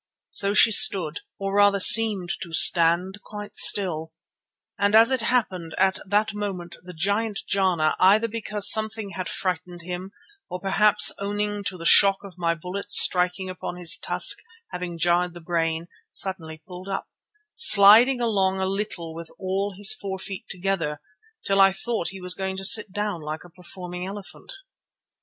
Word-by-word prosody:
So 200 0 +2
she 225 - +5
stood, 175 -7 +4 0.2
or 195 0 -5
rather 205 0 +2
seemed 205 -4 +4
to 170 -3 -9
stand, 175 +4 +3
quite 205 -1 -11
still; 160 -5 +1 0.7
and 205 +1 +1
as 225 +3 +5
it 260 -2 +2
happened, 190 -9 -3
at 190 0 0
that 210 +2 -1
moment 185 -5 -7
the 180 -1 -13
giant 205 +5 -2
Jana, 185 -6 0
either 210 +5 +3
because 210 -2 +1
something 220 -2 -1
had 180 -1 -6
frightened 180 -1 -5
him, 180 +2 -7 0.4
or 180 - -7
perhaps 195 +2 +3
owing 205 +1 -4
to 185 - -5
the 165 - -10
shock 195 +2 +5
of 195 -2 -13
my 170 -1 -1
bullet 180 +4 -8
striking 180 +1 +2
on - - -6
his 175 -2 +3
tusk - - 0 0.3
having 180 -1 -7
jarred 175 +1 -1
the - - -10
brain, 165 -1 -3 0.3
suddenly 160 -5 -4
pulled 185 +1 -11
up, 195 - -5 0.5
sliding 230 - +6
along 195 -5 -1
a 190 - -2
little 190 -4 -5
with 165 0 -10
all 195 +1 -4
his 205 +3 +5
four 195 -5 -7
feet 190 0 -8
together, 175 -6 -4 0.5
till 195 0 +2
I 195 0 +5
thought 220 -1 -4
he 195 - -8
was 180 0 +2
going 190 0 -6
to 195 - -3
sit 210 -1 +4
down 205 -3 -5
like 155 +1 -8
a 175 - -17
performing 180 0 -9
elephant. 200 0 -11
190 Hz, 165 wpm, -22 LUFS, 175-205 Hz, 0.7 s, sliding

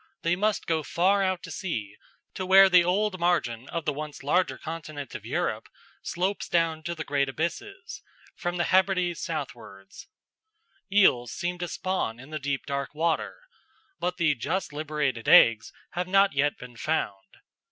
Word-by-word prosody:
They 170 +1 +2
must 210 +3 0
go 160 -1 0
far 190 +6 +2
out 185 -2 0
to - - -8
sea, 110 - -4 0.4
to 190 - -4
where 190 +1 +7
the 180 -1 +6
old 190 +2 0
margin 130 -9 0
of 165 -2 -4
the 150 - 0
once 150 0 -7
larger 180 +6 +1
continent 155 -4 -7
of - - -8
Europe - - -2 0.3
slopes 185 +3 -2
down 165 -2 +1
to 170 - -3
the 160 - -5
great 140 -1 0
abysses, 360 - -5 0.3
from 175 -1 -3
the 175 - +1
Hebrides 185 -2 +2
southwards. 120 -11 -7 0.8
Eels 125 - +4
seem 180 +1 -3
to 175 - -3
spawn 180 -12 -2
in 130 +4 -13
the 155 - -3
deep 140 -1 -3
dark 140 0 -4
water; 165 - -1 0.6
but 180 +1 -2
the 165 -4 +3
just 155 +6 -3
liberated 145 -5 -2
eggs 115 -2 +6 0.2
have 180 0 -3
not 195 -1 +4
yet 145 +1 +1
been 125 -1 -11
found. 100 -10 -3
165 Hz, 165 wpm, -27 LUFS, 140-185 Hz, 0.8 s, where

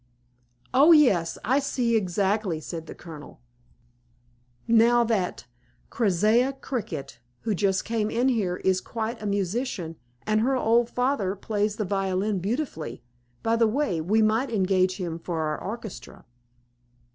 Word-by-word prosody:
"Oh, 290 +6 +7
yes, 195 - +4
I 260 +5 +3
see 250 -4 0
exactly," 195 -2 0
said 160 0 -7
the - - -8
Colonel. 155 -4 -11 1.3
"Now 235 +1 +5
that 210 - -1 0.5
Keziah 220 +4 +2
Cricket, 165 - -5 0.2
who 220 - -1
just 195 0 0
came 225 -2 -1
in 240 +3 +1
here, 205 -8 0
is 185 -1 +1
quite 230 0 -4
a 210 - -3
musician, 200 - -2 0.3
and 215 0 +2
her 265 +4 +2
old 235 0 +2
father 250 -7 0
plays 210 +1 -1
the 215 - -2
violin 195 +1 -1
beautifully; 195 - -4 0.4
by 225 0 +2
the 230 -1 +3
way, 215 - 0
we 215 +7 +2
might 225 +5 +2
engage 185 -3 +1
him 170 -4 -4
for 165 -1 -4
our 155 -1 -2
orchestra." 220 0 -8
210 Hz, 135 wpm, -26 LUFS, 185-235 Hz, 1.3 s, Oh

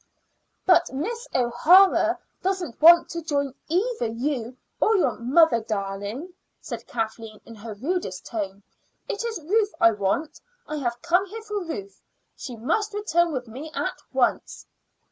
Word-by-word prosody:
"But 360 -2 +4
Miss 465 - -4
O'Hara 300 +11 +5 0.2
doesn't 365 -9 -3
want 340 +2 +8
to 335 - -4
join 285 -4 -1
either 380 - 0
you 245 +1 -3 0.2
or 440 - +3
your 365 - +3
'mother 260 +1 +4
darling,'" 210 - -4 0.3
said - - -7
Kathleen 225 -1 -4
in 230 - -11
her 215 0 -8
rudest 265 - -3
tone. 200 -3 -5 0.4
"It 410 - -3
is 460 -5 -3
Ruth 415 +3 +1
I 230 - +6
want. 205 +9 -2 0.3
I 305 - -4
have 240 -4 -2
come 355 +3 +2
here 445 +3 -8
for 420 -2 -3
her. 330 +4 -4 0.5
She 250 - -7
must 415 - -1
return 345 -5 +1
with 255 -4 -4
me 265 +8 -8
at - - -3
once." - - 0
300 Hz, 145 wpm, -25 LUFS, 230-370 Hz, 0.5 s, want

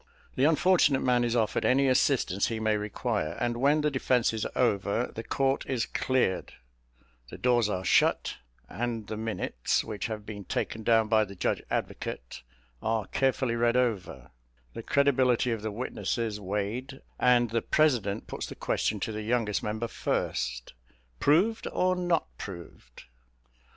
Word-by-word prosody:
The 130 - +2
unfortunate 155 -3 +4
man 125 -1 +3
is 120 0 0
offered 110 -2 +1
any 135 +2 +3
assistance 125 -7 +2
he 115 -1 -3
may 110 -1 +1
require; 105 -5 -2
and 120 -1 0
when 145 +4 +3
the 150 0 +1
defence 125 -3 +1
is 110 - -2
over, 110 0 +1
the 115 - -6
court 135 +3 0
is 125 -4 0
cleared, 130 -8 0 0.8
the - - -9
doors 120 -3 +2
are 95 -2 -3
shut, - - +2 0.3
and 115 - -3
the 110 - -5
minutes, 110 - -1
which 105 -2 -4
have 110 -2 -6
been 105 -2 -7
taken 110 +5 -3
down 115 0 +3
by 110 0 +4
the 100 -1 -8
judge - - -1
advocate, 65 0 -4 0.4
are 110 -2 0
carefully 130 -3 0
read 120 +1 +2
over, 115 -7 -2 0.4
the - - -6
credibility 130 -2 +2
of 115 -2 -2
the 110 - -3
witnesses 115 -1 -3
weighed, 105 +7 -4 0.2
and 120 -2 +4
the 115 0 +1
president 120 -10 +1
puts - - -5
the - - -8
question 105 - -1
to 110 - -2
the 110 0 -4
youngest 110 -4 0
member 110 +2 -3
first, - - -2 0.5
"Proved, 195 +10 +2
or 185 0 +1
not 175 -2 +1
proved?" 85 - -10
115 Hz, 155 wpm, -28 LUFS, 105-130 Hz, 0.8 s, unfortunate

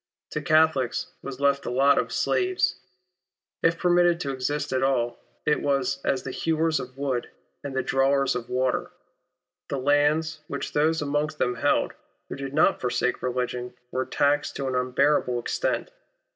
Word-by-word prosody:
To 150 - -2
Catholics 155 -4 +2
was 135 -1 -7
left 140 0 +2
the - - -5
lot 135 +3 +4
of - - -2
slaves. 375 0 +1 0.8
If 165 0 +3
permitted 175 -1 +3
to 140 - -2
exist 135 +2 -2
at 130 - +1
all, 120 -3 0 0.3
it 150 - +2
was 140 -1 0
as 135 -2 0
the 130 - -5
hewers 160 +2 0
of 130 +1 -8
wood 135 -4 -2 0.3
and 140 -2 -5
the 130 - 0
drawers 135 0 +2
of 120 -1 -5
water. 130 0 0 0.8
The 140 - -2
lands 150 +3 +2
which - - -5
those 155 +1 +2
amongst 150 +1 -1
them 125 - +1
held, 140 +4 +1 0.4
who - - -4
did 135 0 -5
not 155 - +3
forsake 125 0 0
religion, 125 -1 -3 0.2
were 130 0 -2
taxed 145 0 +1
to 135 - -3
an 130 - -2
un 125 0 0
bearable 130 -1 +2
extent. - - -2
140 Hz, 165 wpm, -26 LUFS, 130-150 Hz, 0.8 s, lot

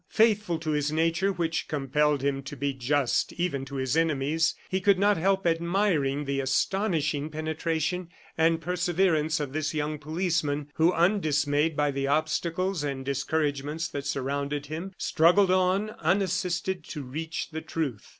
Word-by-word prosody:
Faithful 210 -6 +2
to 160 -1 -3
his 150 0 0
nature, 165 +5 +1
which 165 -3 -2
compelled 150 0 +1
him 140 -1 0
to 140 +2 -8
be 140 +1 -1
just 130 +1 0
even 170 -6 -2
to 135 +1 -8
his 130 +1 -1
enemies, 160 0 +1
he 190 0 -1
could 200 0 +4
not 205 +2 +4
help 195 +3 +1
admiring 165 -4 +1
the 140 0 -1
astonishing 155 +1 0
penetration 160 +2 -2 0.3
and 165 0 +2
perseverance 175 -3 +1
of 145 -3 -4
this 155 0 -2
young 150 0 -2
policeman 155 -2 -1
who, 165 +2 +3
undismayed 155 -4 +2
by 145 -1 +2
the 135 0 -2
obstacles 165 +4 0
and 135 -2 -3
discouragements 145 +3 -1
that 140 -2 -5
surrounded 140 +1 -2
him, 160 +6 -5
struggled 180 +4 +4
on, 185 +3 +2
unassisted, 185 -2 0
to 150 -2 -6
reach 160 +6 -5
the 160 0 -4
truth. 150 -9 -4
160 Hz, 150 wpm, -27 LUFS, 145-175 Hz, 0.3 s, could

